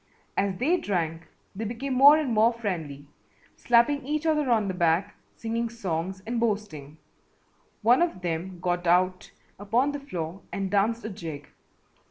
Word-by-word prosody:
As 195 -2 0
they 320 +9 +2
drank 165 - -2 0.3
they 215 - -4
became 240 +5 -3
more 280 +4 +8
and 290 -6 -1
more 220 +2 +4
friendly, 165 -11 -5 0.5
slapping 245 +4 +3
each 300 +3 -2
other 300 -4 +1
on 220 -4 +2
the 190 - -2
back, 175 +3 +1 0.2
singing 230 +1 -2
songs 190 -4 -4
and 235 +1 -2
boasting. 200 -10 -3 0.9
One 240 +7 +5
of 340 - 0
them 175 +2 -3
got 175 0 -1
out 185 +1 +2 0.3
upon 235 +8 +1
the 290 - -5
floor 180 - -6
and 195 -1 -3
danced 215 +3 +1
a - - -3
jig. 160 -7 -8
205 Hz, 155 wpm, -26 LUFS, 175-240 Hz, 0.9 s, more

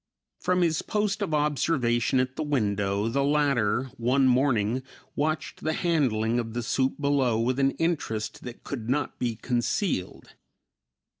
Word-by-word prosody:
From 180 0 +1
his 160 -3 +1
post 210 0 -1
of 200 - -1
observation 135 -5 +1
at 130 0 -1
the - - -3
window 105 -8 0
the 140 +4 +1
latter, 135 -4 +1
one 130 +3 +2
morning, 125 -2 +2 0.3
watched 155 +2 -2
the 155 - 0
handling 120 -10 +1
of 115 -2 -4
the 120 0 -2
soup 130 +3 0
below 140 -5 +2
with 125 +3 0
an 135 0 +4
interest 145 -11 -2
that 125 -1 -9
could 120 -5 -5
not 140 +2 -1
be 120 -2 -1
concealed. 120 - -2
130 Hz, 145 wpm, -27 LUFS, 115-150 Hz, 0.3 s, an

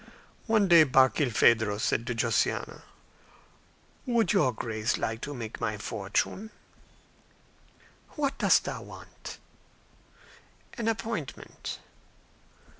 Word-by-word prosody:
One 220 -3 +3
day 170 -3 +8
Barkilphedro 120 -6 +3
said 115 +2 0
to 125 - -2
Josiana, 115 -1 0 1.3
"Would 235 -2 +2
your 175 -10 +3
Grace 110 0 -2
like 115 +1 -3
to 145 - -5
make 115 -3 -7
my 105 -2 -1
fortune?". 105 - -2 1.6
"What 285 -2 -1
dost - - +4
thou - - -5
want?" - - -11 1.4
"An 235 -3 -4
appointment." 220 - -4
130 Hz, 95 wpm, -28 LUFS, -, 1.6 s, day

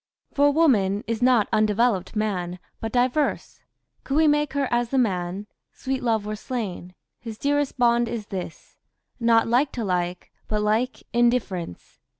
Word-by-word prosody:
...*...*...*...* - - -39
For 285 0 +5
woman 215 -11 +2
is 230 +1 -3
not 245 -4 +4
undevelopt 215 -1 +1
man 185 -5 -2 0.2
But 225 - -4
diverse: 255 +4 0 0.4
could 275 - -3
we 315 0 +5
make 295 -1 +2
her 280 -1 0
as 240 -1 +1
the 270 - -1
man, 190 -4 -1 0.3
Sweet 265 0 -3
Love 225 -3 0
were 215 0 -3
slain; 200 -6 -5 0.2
his 225 -2 -8
dearest 290 +1 0
bond 240 -1 +3
is 220 -3 -4
this, 185 -5 -8 0.4
Not 230 -1 +3
like 255 +5 +2
to 235 - -3
like, 180 -2 -2 0.2
but 210 -1 -1
like 220 +5 0
in 240 0 +5
difference. 185 - -4
230 Hz, 160 wpm, -24 LUFS, 205-255 Hz, 0.4 s, For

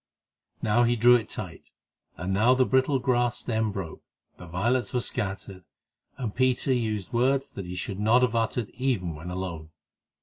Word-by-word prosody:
Now 110 +3 +3
he 120 0 +3
drew 120 +2 +6
it 115 -3 -1
tight, 90 -6 -7 0.4
and 90 +3 -2
now 115 +6 +4
the 130 0 +3
brittle 130 +2 +2
grass 120 -1 +1
stem 110 -2 -1
broke, 95 -5 -6 0.4
the 90 - -10
violets 120 +11 0
were 125 - +2
scattered, 95 -4 -4 0.5
and 120 -6 -4
Peter 130 +1 +1
used 110 -5 -2
words 135 +3 +1
that 95 -3 -7
he 90 - -6
should 95 +2 -4
not 115 +4 +4
have 120 -2 +1
uttered 115 -1 -1
even 120 -10 -1
when 80 +3 -8
alone. 90 -4 -5
110 Hz, 170 wpm, -27 LUFS, 95-125 Hz, 0.5 s, drew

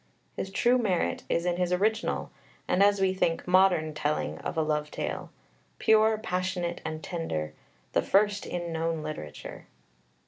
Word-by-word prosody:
His 190 - -4
true 240 +6 +3
merit 190 -7 0
is 170 - +1
in 175 -1 +1
his 180 -1 0
original 215 +5 0 0.4
and, 180 - +2
as 200 0 +5
we 190 -1 +2
think, 170 -3 0
modern 180 -4 +4
telling 150 0 -1
of - - -5
a 160 - +3
love 150 -1 -1
tale - - -4 0.5
pure, 220 0 +4
passionate, 180 -3 -2
and 160 0 -5
tender, 80 - -3 0.4
the - - +3
first 205 +1 +2
in 175 -1 -3
known 165 -1 -1
literature. 75 - -7
180 Hz, 150 wpm, -28 LUFS, 160-195 Hz, 0.5 s, as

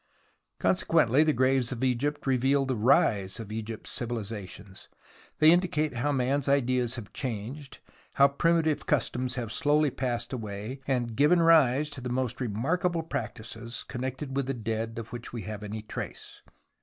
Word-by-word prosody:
Consequently 165 -7 +3
the 155 - +3
graves 130 -1 +2
of 125 0 -4
Egypt 130 +4 0
reveal 135 +1 +2
the 130 -1 -1
rise 105 -3 +2
of 110 -2 -7
Egypt's 110 0 -5
civilizations; 105 -5 -5 0.5
they 155 +1 +7
indicate 165 -6 +1
how 145 +5 +1
man's 135 +1 0
ideas 130 -3 +2
have 115 -5 -8
changed, 130 +3 -5 0.4
how 140 - +7
primitive 160 +1 +1
customs 130 -2 0
have 120 -4 -3
slowly 150 0 +2
passed 120 -2 -3
away 110 +2 -5
and 120 -4 -1
given 150 +7 +4
rise 150 -4 +5
to 130 - -8
the 125 - -4
most 125 0 -2
remarkable 160 - 0
practices 120 -5 -5
connected 130 +2 -4
with 140 -2 0
the 135 - -1
dead 115 0 -3
of 110 0 -7
which 120 -1 -6
we 115 -3 -5
have 105 +1 -6
any 105 +1 -6
trace. - - -7
125 Hz, 155 wpm, -28 LUFS, 115-140 Hz, 0.5 s, they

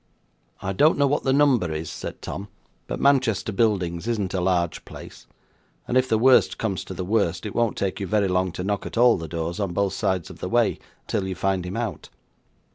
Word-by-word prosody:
'I 95 - -2
don't 150 - +4
know 140 - +4
what 145 +1 +1
the 135 - +3
number 130 - +3
is,' 80 0 -4
said - - -7
Tom; 100 - -5 0.4
'but - - -4
Manchester 130 -7 +2
Buildings 95 -4 0
isn't 105 -6 -1
a 95 - 0
large 90 -2 0
place; - - -12 0.6
and - - -2
if 130 0 +3
the 110 - +3
worst 130 +3 +4
comes 100 -6 -2
to 95 - -7
the 90 - -4
worst 100 -2 0
it 105 - -4
won't 115 -2 0
take 95 -1 -2
you 100 - -3
very 105 0 +2
long 90 0 +1
to 90 - -4
knock 100 0 -2
at - - -7
all 120 0 +6
the 80 -2 -5
doors 85 +2 -4
on 100 -4 -2
both 100 0 0
sides 95 -3 -1
of - - -13
the - - -4
way - - +2 0.3
till 100 -4 -2
you 95 - -3
find 95 -1 -1
him 95 - -4
out. 115 -4 -4
100 Hz, 220 wpm, -24 LUFS, 90-115 Hz, 0.6 s, all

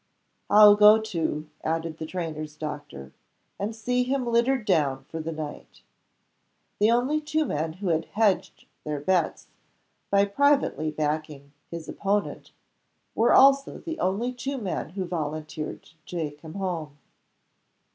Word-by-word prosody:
"I'll 210 0 +8
go 210 +1 +7
too," 165 -7 -3 0.2
added 165 0 -2
the 160 - -5
trainer's 155 -4 -5
doctor; 145 - -7 0.5
"and 210 +3 -3
see 250 +3 0
him 255 +1 -1
littered 235 +1 +1
down 145 -9 +1
for 165 +4 -7
the 160 +1 -4
night." 155 -2 -8 1.0
(The 210 +1 +4
only 255 +6 +2
two 310 +1 0
men 155 - -2
who 185 +2 -4
had 165 -1 +1
"hedged" 210 -3 0 0.2
their 150 -1 -3
bets, 180 +4 0 0.6
by 200 0 +4
privately 275 - +2
backing 150 -2 -3 0.2
his 170 -1 -7
opponent, 205 +1 -2 0.6
were 230 +2 +3
also 275 +1 +5
the 325 -1 -6
only 215 +7 0
two 270 +3 -4
men 195 -8 -3
who 185 +2 -4
volunteered 155 -2 -5
to 165 - -22
take 150 -4 -5
him 160 +1 -10
home!) 170 -7 -4
180 Hz, 135 wpm, -26 LUFS, 155-225 Hz, 1.0 s, I'll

